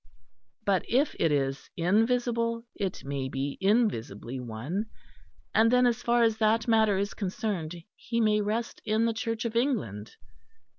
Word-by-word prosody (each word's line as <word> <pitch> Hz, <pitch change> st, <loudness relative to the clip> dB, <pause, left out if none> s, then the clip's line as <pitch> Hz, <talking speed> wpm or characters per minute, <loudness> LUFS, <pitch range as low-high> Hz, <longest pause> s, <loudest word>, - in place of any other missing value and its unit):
But 195 Hz, -2 st, +2 dB
if 265 Hz, +5 st, +2 dB
it 165 Hz, -, +3 dB
is 135 Hz, -1 st, -1 dB
invisible, 230 Hz, +5 st, +1 dB
it 195 Hz, -3 st, -4 dB
may 135 Hz, -1 st, -3 dB
be 135 Hz, +1 st, -3 dB
invisibly 135 Hz, -, 0 dB
one, 125 Hz, -, -4 dB, 0.7 s
and 225 Hz, +1 st, +5 dB
then 250 Hz, 0 st, +5 dB
as 240 Hz, 0 st, +1 dB
far 240 Hz, 0 st, +3 dB
as 225 Hz, -1 st, +2 dB
that 220 Hz, +1 st, +2 dB
matter 220 Hz, -3 st, +4 dB
is 200 Hz, +2 st, -1 dB
concerned, 185 Hz, -4 st, -3 dB, 0.2 s
he 235 Hz, -1 st, -3 dB
may 210 Hz, -2 st, +3 dB
rest 220 Hz, +3 st, -2 dB
in 215 Hz, +2 st, +1 dB
the 230 Hz, -, +1 dB
Church 225 Hz, +1 st, -3 dB
of 230 Hz, -1 st, -3 dB
England. 205 Hz, -, -1 dB
215 Hz, 150 wpm, -28 LUFS, 160-230 Hz, 0.7 s, and